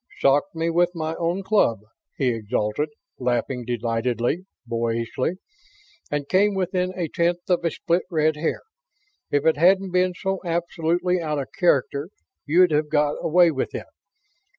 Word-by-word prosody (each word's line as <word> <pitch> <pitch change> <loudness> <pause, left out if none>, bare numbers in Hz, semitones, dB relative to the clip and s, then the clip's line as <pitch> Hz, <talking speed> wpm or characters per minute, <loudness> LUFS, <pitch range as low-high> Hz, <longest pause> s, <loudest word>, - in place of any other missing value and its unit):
"Socked 145 +8 +2
me 165 +1 0
with 175 +1 +2
my 160 -1 -2
own 175 +3 -1
club!" 190 - +2 0.4
he 135 -3 +2
exulted, 110 +5 -1 0.3
laughing 125 0 -1
delightedly, 120 - -1 0.2
boyishly. 115 +4 -1 0.8
"And 145 -1 -2
came 200 +4 +3
within 185 -1 0
a 175 -3 -1
tenth 170 +3 -1
of 180 -1 +2
a 165 - +2
split 170 +3 0
red 155 -3 +2
hair! 155 +2 -2 0.7
If 145 +1 +1
it 160 -2 +4
hadn't 190 +3 +4
been 180 0 +2
so 190 +1 -2
absolutely 175 +1 0
out 155 -2 -2
of 140 - -4
character 145 -3 +1 0.4
you'd've 155 -2 +4
got 150 -1 +1
away 175 +1 +5
with 135 - -3
it. - - -5
160 Hz, 145 wpm, -23 LUFS, 135-180 Hz, 0.8 s, away